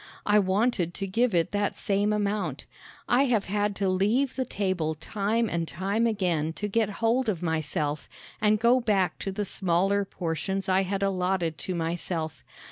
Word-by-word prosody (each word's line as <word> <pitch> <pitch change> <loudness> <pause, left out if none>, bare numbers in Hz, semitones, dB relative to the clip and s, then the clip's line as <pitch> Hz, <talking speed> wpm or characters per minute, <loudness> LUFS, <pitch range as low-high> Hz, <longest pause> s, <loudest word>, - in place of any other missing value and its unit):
I 210 0 +5
wanted 190 -2 +1
to 195 - -3
give 225 +2 +1
it 165 -2 +2
that 205 0 -1
same 205 +1 +1
amount. 200 -8 -1 0.4
I 255 +3 +4
have 230 -6 +1
had 205 +1 0
to 195 0 0
leave 215 +9 +1
the 260 - -1
table 185 -8 -1
time 210 +8 -1
and 170 -4 -2
time 200 +7 0
again 175 -8 0
to 210 - -3
get 215 0 +1 0.2
hold 240 +1 +2
of 180 -4 -2
myself 155 -2 -2 0.3
and 210 0 +3
go 235 +3 +4
back 195 -8 +1
to 195 - -3
the 205 +2 -2
smaller 195 +2 +1
portions 185 +1 -3
I 190 0 +3
had 195 +1 -2
allotted 180 -4 0
to 185 - -3
myself. 165 -1 -3
195 Hz, 170 wpm, -27 LUFS, 175-210 Hz, 0.4 s, I